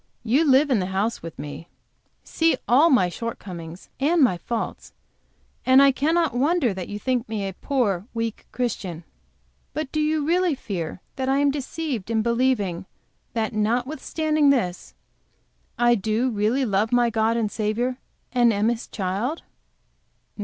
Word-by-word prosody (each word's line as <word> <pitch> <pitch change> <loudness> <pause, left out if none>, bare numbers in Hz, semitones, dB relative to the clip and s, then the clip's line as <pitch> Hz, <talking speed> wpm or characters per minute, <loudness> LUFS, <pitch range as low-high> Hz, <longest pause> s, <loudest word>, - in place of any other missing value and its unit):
You 275 +7 +3
live 275 +2 +5
in 240 - +3
the 185 - -1
house 195 +5 -1
with 165 -1 -8
me, 145 +3 -7 0.6
see 325 0 +1
all 280 +8 +5
my 245 - +4
shortcomings 180 -5 -7
and 320 +6 +2
my 240 -8 +4
faults, 225 +6 -5 0.7
and 260 +1 +6
I 275 0 +7
cannot 320 +3 +1
wonder 275 - +2
that 185 -2 -6
you 205 - -4
think 250 +1 -1
me 210 -3 -2
a 195 - -5
poor, 205 -5 -1
weak 230 -1 -4
Christian. 190 -9 -3 0.7
But 305 -3 -3
do 310 - -1
you 305 -1 +1
really 350 0 +2
fear 180 -8 -5 0.2
that 260 0 -1
I 270 - +3
am 285 0 +3
deceived 275 - -4
in 220 -1 +1
believing 230 -7 0 0.5
that 225 -1 -1
notwithstanding 285 +7 +1
this 205 -10 0 0.8
I 240 0 +4
do 220 +4 0
really 225 +5 +1
love 210 0 +1
my 240 -1 +3
God 225 +1 +1
and 215 -3 -1
Saviour 235 +4 -1 0.4
and 240 -2 +4
am 210 +1 +1
His 235 -1 -3
Child?" 205 - -3
235 Hz, 155 wpm, -24 LUFS, 205-275 Hz, 0.8 s, I